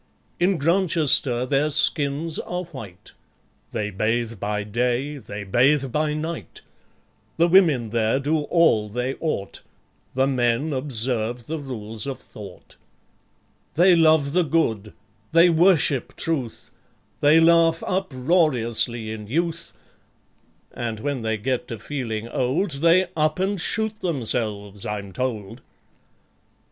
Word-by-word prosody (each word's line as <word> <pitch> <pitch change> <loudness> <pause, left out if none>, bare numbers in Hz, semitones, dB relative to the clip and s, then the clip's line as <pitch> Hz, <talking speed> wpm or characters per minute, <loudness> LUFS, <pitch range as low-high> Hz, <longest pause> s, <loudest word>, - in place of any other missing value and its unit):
In 180 +1 +2
Grantchester 155 -7 +2
their 140 +3 +1
skins 150 +1 +1
are 180 +1 -4
white; 100 - -11 0.6
They 105 -1 -3
bathe 110 +2 -1
by 105 +1 -2
day, 125 +7 -1
they 105 -4 -7
bathe 130 +6 +2
by 150 +2 0
night; 160 +2 -6 0.8
The 170 +1 +4
women 160 - +4
there 115 +2 +1
do 150 +3 0
all 130 -13 +3
they 125 +4 -2
ought; 125 -12 -3 0.5
The 130 +1 +3
men 130 +3 0
observe 120 -3 -2
the 160 +4 -4
Rules 115 -4 -6
of 135 - -4
Thought. 100 -4 -13 1.0
They 180 +2 +6
love 155 -3 +3
the 180 - +3
Good; 115 - 0 0.4
they 170 +2 +6
worship 160 -6 +3
Truth; 135 -9 -4 0.5
They 150 +3 +5
laugh 165 0 +4
uproariously 130 - 0
in 105 -1 -7
youth; 165 +5 -2 1.0
(And 115 -2 -4
when 140 +1 -3
they 110 0 -1
get 125 +4 -2
to 115 - -6
feeling 115 -2 -4
old, 140 +11 -1
They 165 +6 +3
up 155 -1 +1
and 190 0 0
shoot 220 +3 -1
themselves, 110 - -2
I'm 100 -2 -5
told)... 115 -1 -4
135 Hz, 120 wpm, -23 LUFS, 115-165 Hz, 1.0 s, They